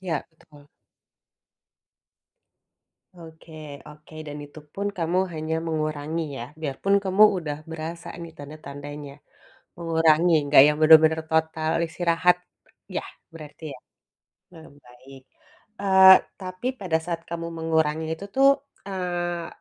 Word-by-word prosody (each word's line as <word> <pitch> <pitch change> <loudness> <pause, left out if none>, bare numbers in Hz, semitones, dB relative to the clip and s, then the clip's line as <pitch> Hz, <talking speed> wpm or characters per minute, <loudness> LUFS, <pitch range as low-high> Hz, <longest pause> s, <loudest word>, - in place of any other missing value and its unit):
Iya, 175 -5 -3
betul. 145 -2 -21 2.5
Oke 165 0 -14 0.4
oke, 150 +1 -17
dan 145 0 -7
itu 145 +2 -14
pun 200 +1 -4
kamu 170 +2 0 0.2
hanya 155 +1 -3
mengurangi 155 0 -2 0.2
ya, - - -5 0.2
biarpun 155 +7 -1
kamu 190 +3 +3 0.2
udah 150 -4 -4
berasa 165 +1 -7 0.2
nih, 165 - -8
tanda-tandanya. 145 0 -9 0.7
Mengurangi, 165 0 +3
nggak 140 -2 +7
yang 150 - +1
benar-benar 160 0 +6
total 160 0 0 0.2
istirahat 175 +1 +2 0.6
yah, - - -4 0.3
berarti 155 0 -12
ya? - - -12 0.7
mmm, 160 -2 -14 0.2
baik. 130 +2 -15 0.6
Eee, 190 -1 +5 0.3
tapi 185 +5 -7
pada 165 -4 0
saat 170 -1 -3
kamu 170 0 -4
mengurangi 160 -1 0
itu 195 - -10
tuh, 270 +1 +5 0.4
eee, 175 -2 -3
160 Hz, 115 wpm, -24 LUFS, 150-175 Hz, 2.5 s, nggak